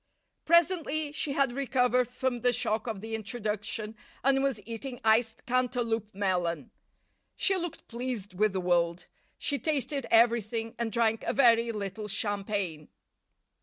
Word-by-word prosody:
Presently 330 -3 +2
she 295 -1 -2
had 275 -2 +2
recovered 250 -1 +2
from 250 0 -2
the 245 - +4
shock 220 -1 -1
of 215 -4 -4
the 225 +1 -6
introduction, 215 -1 -3 0.3
and 270 +1 +3
was 270 -5 0
eating 240 +2 -6
iced 225 +1 +2
Cantaloup 240 -4 -1
melon. 180 -4 -1 0.6
She 390 - +2
looked 345 -3 -4
pleased 235 -5 -4
with 210 +3 +2
the 190 - -1
world. 175 -1 +1 0.3
She 285 -2 -1
tasted 285 -3 -1
everything, 230 -1 +3
and 235 -1 -1
drank 225 0 +2
a - - 0
very 235 -3 +4
little 210 0 -5
champagne. 200 -6 -2
230 Hz, 135 wpm, -29 LUFS, 210-255 Hz, 0.6 s, the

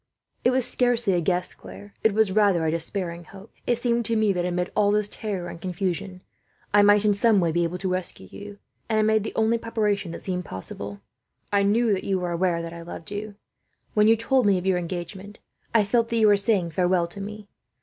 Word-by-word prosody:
"It - - +4
was 255 -1 +1
scarcely 240 -5 +2
a 175 - +1
guess, 180 +1 0
Claire. 95 +2 -12
It 220 - +4
was 220 -3 +3
rather 195 -5 +3
a 155 - +1
despairing 170 +1 -3
hope. 195 +5 -14
It 240 - +2
seemed 235 0 0
to 230 - +2
me 215 -2 +2
that, 175 -1 -1
amid 180 0 -2
all 205 -1 +3
this 210 0 +2
terror 205 -5 -5
and 165 - -9
confusion, 185 +1 -3 0.5
I 205 - +7
might 205 +1 +5
in 210 - +4
some 210 0 +3
way 170 -3 +1
be 170 +2 +1
able 170 +2 -2
to 190 - -3
rescue 180 - -3
you; 205 0 -10 0.3
and 220 - +1
I 215 - +3
made 220 -1 +2
the - - -6
only 225 +1 +2
preparation 210 -5 -1
that 165 - -7
seemed 180 -2 -3
possible. 100 - -6 0.5
"I 200 - +4
knew 215 +2 +2
that 190 - -2
you 195 -1 0
were 180 -1 -3
aware 170 -1 0
that 165 0 -7
I 170 - -8
loved 170 +1 -9
you. 205 0 -5 0.6
When 210 0 +4
you 225 - +6
told 230 +1 +1
me 195 -2 +4
of 180 - -5
your 185 -2 +2
engagement, 185 +4 -6 0.3
I 225 -2 +4
felt 230 +2 +1
that 235 - 0
you 220 - +4
were 205 -1 +6
saying 200 -4 +1
farewell 180 +1 +2
to 185 +4 -9
me. 210 +1 -8
200 Hz, 230 wpm, -25 LUFS, 175-215 Hz, 0.6 s, I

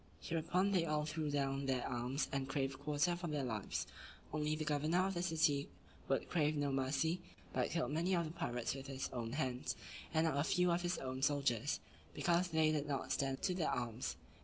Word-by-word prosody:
Hereupon 175 +4 +1
they 185 -4 +3
all 150 -2 +1
threw 155 0 -2
down 140 -1 0
their 130 -2 +1
arms, 125 +3 -1
and 135 -1 -1
craved 135 -1 -1
quarter 150 +4 +2
for 175 0 -4
their 150 -3 -1
lives; 110 -5 -2 0.5
only 155 0 +1
the 155 0 -3
governor 155 +5 +2
of 195 - 0
the 175 - -1
city 160 -5 +2 0.4
would - - +1
crave 155 -3 +2
no 145 -1 +1
mercy, 135 +6 +1 0.3
but - - +1
killed 160 -6 0
many 170 +5 +2
of 170 -1 +1
the 155 - -4
pirates 120 -7 -2
with 135 0 -7
his 135 -1 -3
own 120 -2 -3
hands, 130 -3 -1 0.4
and 160 0 +3
not 155 -4 +1
a - - +3
few 180 +2 +3
of 170 +1 +2
his 175 +1 0
own 130 0 -4
soldiers; 140 -5 +2 0.4
because 175 +1 +3
they 160 -2 +3
did 150 -1 0
not 135 -2 -2
stand 135 0 0
to 185 - +2
their 175 -3 +1
arms. 120 0 -2
150 Hz, 205 wpm, -38 LUFS, 135-165 Hz, 0.5 s, they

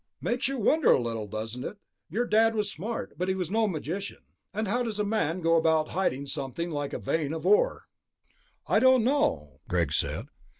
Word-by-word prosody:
"Makes 245 +2 0
you 275 0 -2
wonder 295 +7 +3
a - - +5
little, 115 -3 -3
doesn't 110 +4 -5
it? 210 - -6 0.3
Your 240 +3 0
Dad 225 0 +3
was 210 -2 0
smart, 215 +8 -5
but 180 - 0
he 190 - +1
was 180 -2 -3
no 220 +1 +2
magician. 190 +3 -4 0.3
And 215 +1 -2
how 240 +6 +1
does 225 -4 -3
a - - +2
man 185 -5 0
go 165 0 +4
about 160 -1 +2
hiding 140 -7 -1
something 140 +5 -4
like 145 -2 -3
a - - -1
vein 155 -2 -1
of 160 - -5
ore?" - - +3 0.8
"I - - +3
don't 260 0 +5
know," 290 +4 0
Greg - - +1
said. - - -1
195 Hz, 200 wpm, -28 LUFS, 155-225 Hz, 0.8 s, a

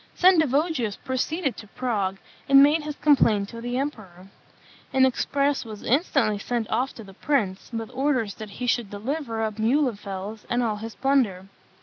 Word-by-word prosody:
Sendivogius 315 - +3
proceeded 270 +3 -2
to 210 - -10
Prague, 200 -5 -2 0.3
and 275 0 +8
made 300 +3 +4
his 300 -1 -5
complaint 225 -10 +3
to 230 -1 -8
the 245 +1 -3
emperor. 195 -10 -5 0.6
An 265 0 +5
express 280 +2 0
was 215 -3 -9
instantly 255 - +1
sent 235 +1 -2
off 260 +2 0
to 225 - -9
the 195 -1 -13
prince, 200 -6 -1
with 225 0 -5
orders 255 -6 0
that 215 -1 -9
he 250 +5 -6
should 240 -3 0
deliver 225 +2 -3
up 215 -1 -3
Muhlenfels 215 -5 -1
and 240 +1 +1
all 215 -3 -1
his 225 +1 -7
plunder. 250 -9 +1
240 Hz, 160 wpm, -25 LUFS, 210-275 Hz, 0.6 s, and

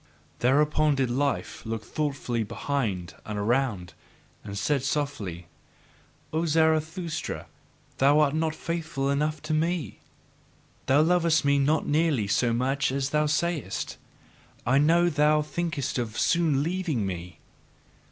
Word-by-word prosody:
Thereupon 150 +3 +3
did 130 -3 0
Life 140 +3 -1
look 110 -1 -4
thoughtfully 135 -6 -2
behind 110 -5 -2
and 105 -1 -5
around, 105 -4 0 0.5
and 100 -1 -6
said 135 +7 +1
softly: 135 - -3 0.9
"O 165 +2 0
Zarathustra, 160 +1 0 0.5
thou 140 +3 +5
art 145 -2 +3
not 160 0 0
faithful 155 -5 -2
enough 150 +1 -1
to 155 0 -2
me! 165 0 -1 0.9
Thou 140 +3 +5
lovest 165 -2 +3
me 140 0 +3
not 150 +3 +2
nearly 150 -7 +2
so 115 +4 +1
much 130 +4 0
as 135 +1 -1
thou 150 0 +2
sayest; 150 - -2 0.7
I 135 +3 +4
know 170 +4 +4
thou 150 -1 +3
thinkest 155 -4 -2
of 115 -2 -4
soon 160 -5 +2
leaving 165 - -1
me. 90 -1 -6
145 Hz, 125 wpm, -27 LUFS, 125-155 Hz, 0.9 s, thou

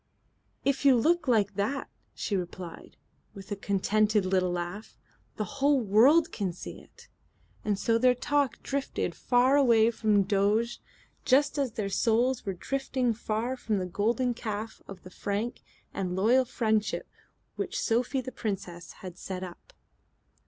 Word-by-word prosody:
"If 275 0 +1
you 275 -2 +7
look 325 +5 +2
like 210 -5 +3
that," 210 +8 -2 0.3
she 205 - -2
replied, 180 -2 -6 0.4
with 195 +1 -11
a - - 0
contented 205 +1 +1
little 185 -1 +1
laugh, 175 +4 -5 0.4
"the 215 - -2
whole 280 +3 +2
world 245 +10 +5
can 195 -5 -2
see 180 - -8
it." - - -19 0.6
And 205 -2 0
so 230 +3 +1
their 250 +1 +4
talk 285 +1 0
drifted 275 0 -2
far 250 +2 +3
away 235 -5 +5
from 215 -3 +2
Doges, 205 +4 +1 0.4
just 285 +3 +3
as 265 -5 -1
their 215 -3 -2
souls 235 +4 +1
were 195 - 0
drifting 260 +3 -1
far 225 +3 -2
from 225 -4 -2
the 185 - -1
Golden 230 +7 0
Calf 220 -1 -5
of 190 -2 -10
the 185 - -11
Frank 205 +5 -3 0.3
and 180 -2 -2
Loyal 240 +7 +4
Friendship 220 -3 0 0.5
which - - -3
Sophie 250 +4 0
the 255 - -7
Princess 185 -7 -5
had 180 -2 -8
set 185 -1 -5
up. 175 -2 -10
220 Hz, 150 wpm, -28 LUFS, 195-255 Hz, 0.6 s, you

